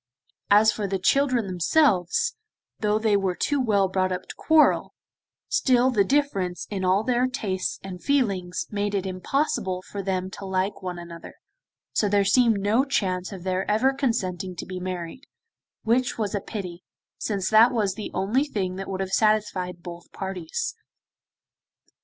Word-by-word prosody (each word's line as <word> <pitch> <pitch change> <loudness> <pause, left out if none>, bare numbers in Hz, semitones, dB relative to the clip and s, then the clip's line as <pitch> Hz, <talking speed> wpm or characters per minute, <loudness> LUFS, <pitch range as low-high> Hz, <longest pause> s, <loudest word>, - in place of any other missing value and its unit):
As 210 +2 +6
for 210 -2 -3
the 195 0 -1
children 255 +3 +2
themselves, 195 - +2 0.4
though 210 0 +1
they 215 -1 +2
were 190 -2 0
too 285 +6 0
well 205 -5 +2
brought 185 0 0
up 185 0 -3
to - - -10
quarrel, 315 -1 +3 0.5
still 255 0 +3
the 210 -5 +3
difference 195 -8 0
in 195 -2 -3
all 185 +3 +3
their 250 +1 +2
tastes 195 -7 -2
and 185 -2 -8
feelings 195 -11 0
made 205 0 -1
it 195 -1 -1
impossible 185 -1 -1
for 200 - -6
them 190 -1 -2
to 200 - -9
like 190 +1 -1
one 180 -1 -5
another, 170 -1 -10 0.6
so 210 - +1
there 200 0 +3
seemed 225 0 +4
no 210 +6 +2
chance 185 -9 -1
of 190 -3 -8
their 185 +1 -1
ever 250 +6 +3
consenting 195 -9 -2
to 160 - -6
be 185 -1 -6
married, 180 - -6 0.6
which 240 +2 +1
was 210 -3 -2
a 205 - -1
pity, 180 -5 -7 0.4
since 200 -3 -2
that 225 +3 +7
was 210 -6 0
the 210 +2 -6
only 215 +9 +1
thing 190 -9 -3
that 195 - -5
would 190 0 -3
have 190 0 -4
satisfied 190 -5 +1
both 170 -1 -9
parties. 190 - -4
195 Hz, 165 wpm, -25 LUFS, 185-230 Hz, 0.6 s, that